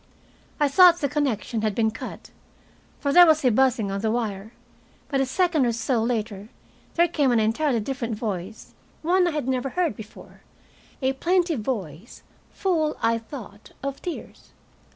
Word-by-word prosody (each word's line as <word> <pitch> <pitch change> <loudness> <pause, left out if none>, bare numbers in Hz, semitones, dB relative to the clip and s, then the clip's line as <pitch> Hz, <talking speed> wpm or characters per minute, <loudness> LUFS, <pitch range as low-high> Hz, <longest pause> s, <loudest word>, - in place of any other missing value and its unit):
I 295 - +4
thought 350 +4 +7
the 290 - -1
connection 260 -6 -1
had 215 -2 -1
been 220 -1 +2
cut, 225 - -9 0.7
for 280 -1 -1
there 355 +1 +9
was 310 -3 +3
a 250 - +5
buzzing 230 -4 +2
on 195 0 -3
the 220 - 0
wire. 215 -3 -3 0.6
But 275 -2 +1
a 270 - 0
second 340 0 +1
or - - +2
so 235 +1 0
later 220 -3 -3 0.5
there 345 0 +4
came 295 -6 +1
an 235 - +3
entirely 230 +3 +1
different 235 -1 -3
voice, 205 -2 -6 0.3
one 360 +2 +3
I - - +2
had 300 -5 -3
never 260 0 -1
heard 345 +2 -1
before, 220 -3 -13 0.6
a 265 +1 +2
plaintive 345 0 +1
voice, 210 - -5 0.3
full, 320 -5 -1
I 230 0 +2
thought, 220 -4 -11
of 275 0 -4
tears. 350 - -8
255 Hz, 165 wpm, -24 LUFS, 220-305 Hz, 0.7 s, there